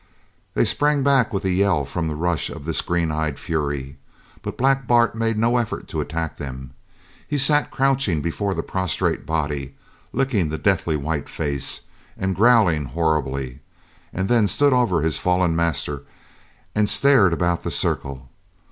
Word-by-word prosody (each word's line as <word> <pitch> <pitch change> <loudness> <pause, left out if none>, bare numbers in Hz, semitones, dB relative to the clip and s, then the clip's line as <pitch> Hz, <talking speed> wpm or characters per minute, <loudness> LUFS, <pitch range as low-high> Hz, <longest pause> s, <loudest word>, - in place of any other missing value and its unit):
They - - +3
sprang 145 -1 +2
back 135 -4 +3
with 100 -2 -3
a 95 - +1
yell 90 -6 +2
from 80 +4 -3
the 75 - -3
rush 85 +1 -1
of 70 - -9
this 80 - 0
green 85 -2 -1
eyed 75 -2 -2
fury; 70 -3 -3 0.4
but - - -6
Black 135 0 +2
Bart 120 -1 +4
made 115 -1 -1
no 115 +3 +2
effort 115 -3 -3
to - - -2
attack 80 +1 -4
them. 65 -2 -7 0.6
He 145 - -1
sat 145 +2 +2
crouching 135 - +1
before 95 +6 -2
the - - -2
prostrate 95 -3 -1
body, 75 -4 -2 0.4
licking 120 - 0
the 80 - -3
deathly 85 -4 +1
white 75 +1 -3
face, 70 -3 -1 0.4
and 95 0 -1
growling 100 - +4
horribly, 70 -3 -1 0.5
and 95 +1 -2
then 115 -2 +3
stood 140 +5 +3
over 110 -11 +2
his 80 -1 +1
fallen 90 -2 +1
master 80 -4 -1 0.7
and 105 -1 +2
stared 135 -9 +5
about 85 0 0
the - - -3
circle. 70 -1 -2
85 Hz, 160 wpm, -22 LUFS, 75-115 Hz, 0.7 s, stared